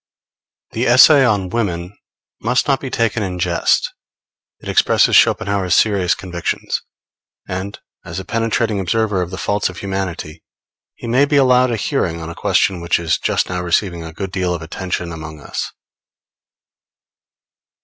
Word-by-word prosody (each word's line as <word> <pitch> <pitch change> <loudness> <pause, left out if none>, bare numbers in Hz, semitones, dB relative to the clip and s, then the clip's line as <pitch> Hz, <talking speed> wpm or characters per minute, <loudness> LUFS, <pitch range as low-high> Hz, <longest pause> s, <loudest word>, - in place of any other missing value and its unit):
The 120 +3 -1
essay 135 +4 +7
on 100 -7 +1
Women 90 -4 -3 0.5
must 125 +3 +1
not 135 -2 +2
be 135 - -6
taken 115 -1 0
in 90 -3 -3
jest. 85 -1 +1 0.7
It - - -12
expresses - - +3
Schopenhauer's 95 -3 +3
serious 100 -5 +2
convictions; 90 -2 -3 0.7
and, 95 +2 -5 0.2
as 85 +3 -6
a 95 - -7
penetrating 115 -1 0
observer 105 +1 0
of 90 - -3
the 95 - -7
faults 100 +6 0
of 90 - -10
humanity, 95 -5 -5 0.5
he - - -10
may 125 +5 +3
be 145 - 0
allowed 130 -2 +4
a 120 - 0
hearing 90 -6 -1
on 80 0 -6
a - - -7
question 90 +1 +1
which 85 0 +1
is 85 -2 0
just - - 0
now 90 0 -3
receiving 85 0 0
a 80 - -8
good 95 +3 -6
deal 90 -2 -1
of 80 - -7
attention 90 +1 -4
among 80 -2 -8
us. - - -5
95 Hz, 155 wpm, -18 LUFS, 85-110 Hz, 0.7 s, essay